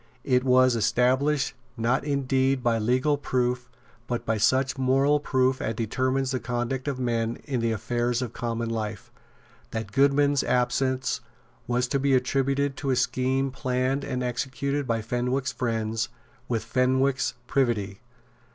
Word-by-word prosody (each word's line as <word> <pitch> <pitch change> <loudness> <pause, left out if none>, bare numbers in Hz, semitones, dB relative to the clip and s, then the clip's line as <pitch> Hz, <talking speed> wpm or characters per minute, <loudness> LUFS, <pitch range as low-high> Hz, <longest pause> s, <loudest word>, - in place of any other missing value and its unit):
It 125 -2 +2
was 130 -1 +4
established, 130 +6 +2 0.2
not 115 +3 +1
indeed 135 -2 +1
by 115 -2 +2
legal 130 +6 +1
proof, 125 -2 -1 0.4
but 120 -1 -3
by 110 -1 0
such 130 +4 +2
moral 135 +2 +3
proof 130 -2 +1
as 115 - -2
determines 130 +4 0
the 130 - -1
conduct 120 +3 -3
of 140 -2 -1
men 115 -2 -1
in 135 -5 -2
the 115 0 0
affairs 120 +2 -1
of 120 -2 -6
common 115 -1 -3
life, 110 -2 -4 0.6
that 110 -3 -5
Goodman's 140 +3 +3
absence 130 +1 0 0.5
was 125 +1 +1
to 140 - +1
be 135 0 +3
attributed 135 +2 +1
to 140 - -3
a 130 - +3
scheme 130 +2 0
planned 130 +1 -1
and 125 -2 -3
executed 135 +3 -2
by 115 -1 0
Fenwick's 125 +4 -1
friends 115 -3 -2 0.4
with 115 -3 -1
Fenwick's 130 +3 +1
privity. 115 -7 0
130 Hz, 140 wpm, -26 LUFS, 120-135 Hz, 0.6 s, was